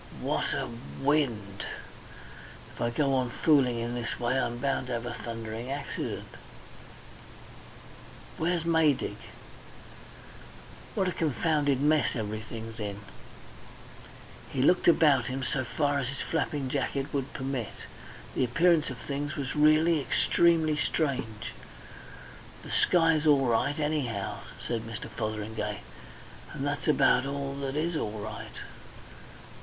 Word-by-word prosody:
What -, -, 0 dB
a -, -, -1 dB, 0.3 s
wind! 120 Hz, -9 st, 0 dB, 1.1 s
If -, -, -10 dB
I 120 Hz, -, +2 dB
go 135 Hz, +3 st, +1 dB
on 130 Hz, -2 st, +1 dB
fooling 130 Hz, -3 st, +3 dB
in 120 Hz, +1 st, -2 dB
this 120 Hz, -2 st, -3 dB
way 125 Hz, +2 st, +1 dB
I'm 120 Hz, -1 st, -1 dB
bound 135 Hz, 0 st, -1 dB
to 125 Hz, -, -3 dB
have 115 Hz, 0 st, -2 dB
a 120 Hz, -, -3 dB
thundering 115 Hz, +1 st, -5 dB
accident!... 140 Hz, 0 st, -4 dB, 2.1 s
"Where's 170 Hz, +1 st, +1 dB
Maydig? 160 Hz, -5 st, +2 dB, 1.8 s
"What 195 Hz, -4 st, +1 dB
a -, -, +1 dB
confounded 145 Hz, -3 st, +1 dB
mess 150 Hz, 0 st, +3 dB
everything's 110 Hz, +1 st, -5 dB
in!" 100 Hz, -1 st, -4 dB, 1.5 s
He 130 Hz, -, 0 dB
looked 180 Hz, +5 st, +4 dB
about 150 Hz, -7 st, +5 dB
him 130 Hz, +1 st, -3 dB
so 135 Hz, 0 st, 0 dB
far 145 Hz, +3 st, 0 dB
as 135 Hz, -, -2 dB
his 135 Hz, +1 st, -4 dB
flapping 145 Hz, -4 st, -1 dB
jacket 140 Hz, +1 st, -2 dB
would 135 Hz, -2 st, -1 dB
permit. 130 Hz, -4 st, -3 dB, 0.6 s
The -, -, +1 dB
appearance 165 Hz, +5 st, +3 dB
of 130 Hz, -, -6 dB
things 145 Hz, +3 st, -4 dB
was 140 Hz, -3 st, -3 dB
really 155 Hz, +1 st, +5 dB
extremely 160 Hz, +3 st, +3 dB
strange. 130 Hz, -9 st, -1 dB, 1.1 s
"The -, -, -8 dB
sky's 165 Hz, -3 st, +4 dB
all 140 Hz, -3 st, +5 dB
right 125 Hz, +4 st, +1 dB
anyhow," 145 Hz, -10 st, -1 dB, 0.3 s
said 115 Hz, -2 st, -1 dB
Mr. 115 Hz, -1 st, -6 dB
Fotheringay. 105 Hz, -1 st, -3 dB, 0.7 s
"And 135 Hz, -, -3 dB
that's 145 Hz, +2 st, -2 dB
about 135 Hz, -3 st, +4 dB
all 140 Hz, 0 st, -3 dB
that 140 Hz, 0 st, -3 dB
is 165 Hz, +3 st, 0 dB
all 110 Hz, -7 st, -2 dB
right. 105 Hz, +1 st, -7 dB
135 Hz, 125 wpm, -29 LUFS, 120-150 Hz, 2.1 s, about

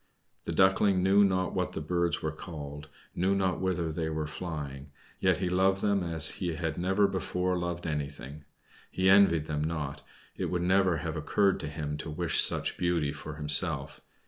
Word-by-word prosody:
The -, -, -3 dB
Duckling 95 Hz, 0 st, +3 dB
knew 100 Hz, +2 st, +5 dB
not 95 Hz, -2 st, +1 dB
what 90 Hz, -1 st, -2 dB
the -, -, -3 dB
birds 85 Hz, +2 st, -1 dB
were 80 Hz, -, -1 dB
called, 75 Hz, -2 st, -8 dB, 0.2 s
knew 95 Hz, +3 st, +1 dB
not 95 Hz, -3 st, 0 dB
whither 90 Hz, -3 st, -1 dB
they 80 Hz, 0 st, -2 dB
were 80 Hz, -1 st, -2 dB
flying; 75 Hz, -4 st, -6 dB, 0.3 s
yet -, -, +3 dB
he 90 Hz, -, -1 dB
loved 95 Hz, +2 st, +2 dB
them 100 Hz, -2 st, +2 dB
as 85 Hz, -3 st, -2 dB
he 85 Hz, -2 st, -1 dB
had 80 Hz, -2 st, -2 dB
never 95 Hz, +3 st, +2 dB
before 90 Hz, -1 st, -1 dB
loved 85 Hz, -1 st, -3 dB
anything. 75 Hz, -1 st, -5 dB, 0.5 s
He 95 Hz, +1 st, +2 dB
envied 95 Hz, -6 st, +5 dB
them 75 Hz, -1 st, -2 dB
not; 75 Hz, -4 st, -3 dB, 0.3 s
it -, -, -3 dB
would 90 Hz, -1 st, -1 dB
never 95 Hz, -1 st, +3 dB
have 80 Hz, +1 st, -4 dB
occurred 95 Hz, +5 st, +1 dB
to -, -, -5 dB
him 75 Hz, -1 st, -4 dB
to 80 Hz, -, -6 dB
wish 80 Hz, +1 st, +2 dB
such -, -, 0 dB
beauty 85 Hz, -5 st, +1 dB
for 75 Hz, +1 st, -8 dB
himself. 75 Hz, -1 st, +1 dB
85 Hz, 180 wpm, -29 LUFS, 75-95 Hz, 0.5 s, knew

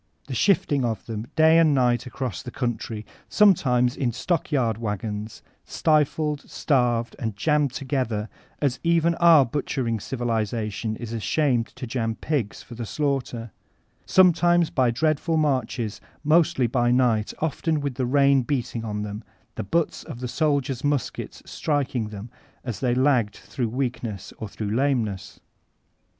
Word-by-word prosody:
The 135 Hz, -, -6 dB
shifting 145 Hz, -, +2 dB
of 110 Hz, -5 st, -2 dB
them 110 Hz, 0 st, -5 dB
day 160 Hz, +1 st, +6 dB
and 155 Hz, -3 st, +4 dB
night 125 Hz, -1 st, +2 dB
across 125 Hz, 0 st, -4 dB
the -, -, -7 dB
country, 115 Hz, -3 st, -3 dB, 0.2 s
sometimes 125 Hz, -11 st, +4 dB
in 125 Hz, -3 st, 0 dB
stock 165 Hz, +7 st, -2 dB
yard 115 Hz, -6 st, +1 dB
wagons, 105 Hz, 0 st, -4 dB, 0.2 s
stifled, 150 Hz, -1 st, +1 dB
starved, 120 Hz, -5 st, +1 dB
and 110 Hz, -6 st, -3 dB
jammed 150 Hz, +4 st, +1 dB
together, 125 Hz, -6 st, -2 dB, 0.4 s
as 135 Hz, -3 st, +1 dB
even 170 Hz, 0 st, +3 dB
our 165 Hz, -5 st, +7 dB
butchering 120 Hz, -3 st, -2 dB
civilization 110 Hz, -3 st, -2 dB
is 115 Hz, 0 st, -7 dB
ashamed 120 Hz, +2 st, +1 dB
to -, -, -6 dB
jam 115 Hz, -2 st, -2 dB
pigs 135 Hz, -8 st, -2 dB
for -, -, -12 dB
the 120 Hz, 0 st, -5 dB
slaughter; 130 Hz, -6 st, -2 dB, 0.6 s
sometimes 175 Hz, -2 st, +4 dB
by 130 Hz, -2 st, +2 dB
dreadful 155 Hz, +5 st, +1 dB
mardies, 130 Hz, -7 st, -1 dB, 0.2 s
mostly 155 Hz, -4 st, +3 dB
by 120 Hz, 0 st, +1 dB
night, 120 Hz, -4 st, +2 dB
often 160 Hz, 0 st, -1 dB
with 140 Hz, -2 st, -2 dB
the 125 Hz, 0 st, -2 dB
rain 140 Hz, 0 st, +4 dB
beating 120 Hz, -3 st, -2 dB
on 105 Hz, -2 st, -3 dB
them, 105 Hz, 0 st, -6 dB, 0.3 s
the -, -, -4 dB
butts 165 Hz, -, -1 dB
of 120 Hz, -, -8 dB
the 125 Hz, -, -3 dB
sddiers' 140 Hz, -2 st, 0 dB
muskets 145 Hz, -3 st, -2 dB
striking 135 Hz, -7 st, -1 dB
them, 105 Hz, +2 st, -8 dB, 0.3 s
as 120 Hz, -6 st, -4 dB
they 125 Hz, -2 st, +1 dB
lagged 130 Hz, -5 st, +2 dB
through 120 Hz, -4 st, -4 dB
weakness 120 Hz, -5 st, -4 dB
or 110 Hz, -, -5 dB
through 105 Hz, +1 st, -3 dB
lameness. 120 Hz, -8 st, -1 dB
125 Hz, 145 wpm, -24 LUFS, 115-145 Hz, 0.6 s, our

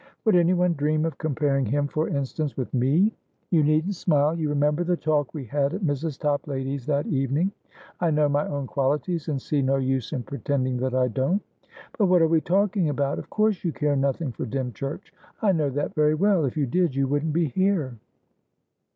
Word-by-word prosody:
Would 215 Hz, -4 st, +4 dB
anyone 175 Hz, 0 st, +3 dB
dream 155 Hz, +1 st, 0 dB
of 165 Hz, -, -4 dB
comparing 140 Hz, -3 st, 0 dB
him, 145 Hz, +5 st, 0 dB
for 155 Hz, +2 st, -1 dB
instance, 140 Hz, +1 st, -3 dB
with 130 Hz, -, -4 dB
me? 145 Hz, -, +3 dB, 0.4 s
You 165 Hz, -3 st, +4 dB
needn't 155 Hz, +6 st, +2 dB
smile. 155 Hz, -4 st, +2 dB
You 160 Hz, -3 st, -1 dB
remember 150 Hz, +3 st, +1 dB
the 175 Hz, 0 st, 0 dB
talk 150 Hz, -4 st, 0 dB
we 140 Hz, -4 st, -5 dB
had 140 Hz, +6 st, 0 dB
at 200 Hz, -, -5 dB
Mrs. 145 Hz, -1 st, -1 dB
Toplady's, 140 Hz, -2 st, -2 dB
that 145 Hz, -1 st, +1 dB
evening. 140 Hz, +7 st, 0 dB, 0.5 s
I 170 Hz, -, +2 dB
know 150 Hz, -1 st, +3 dB
my 145 Hz, +1 st, 0 dB
own 140 Hz, -1 st, -3 dB
qualities, 145 Hz, +5 st, -1 dB
and 145 Hz, -4 st, -1 dB
see 145 Hz, +2 st, -1 dB
no 135 Hz, +1 st, +2 dB
use 130 Hz, -2 st, -1 dB
in 130 Hz, -6 st, -3 dB
pretending 130 Hz, -2 st, -2 dB
that 130 Hz, +1 st, -1 dB
I 130 Hz, -1 st, +3 dB
don't. 135 Hz, -, 0 dB, 0.6 s
But 205 Hz, -, +4 dB
what 180 Hz, -2 st, +4 dB
are -, -, +5 dB
we 160 Hz, 0 st, +3 dB
talking 190 Hz, -1 st, +1 dB
about! 140 Hz, -1 st, -1 dB
Of -, -, -10 dB
course 215 Hz, -2 st, +1 dB
you 170 Hz, -, 0 dB
care 150 Hz, -1 st, 0 dB
nothing 140 Hz, +1 st, 0 dB
for 120 Hz, -, -5 dB
Dymchurch. 135 Hz, -, -5 dB, 0.3 s
I 210 Hz, -, +3 dB
know 155 Hz, -5 st, +1 dB
that 145 Hz, +2 st, -3 dB
very 150 Hz, 0 st, +3 dB
well. 190 Hz, -2 st, +3 dB
If 135 Hz, -, -3 dB
you 145 Hz, -, +2 dB
did, 170 Hz, +2 st, 0 dB
you 135 Hz, 0 st, +1 dB
wouldn't 145 Hz, +3 st, 0 dB
be 165 Hz, -2 st, +1 dB
here." 185 Hz, -6 st, 0 dB
150 Hz, 200 wpm, -25 LUFS, 135-165 Hz, 0.6 s, are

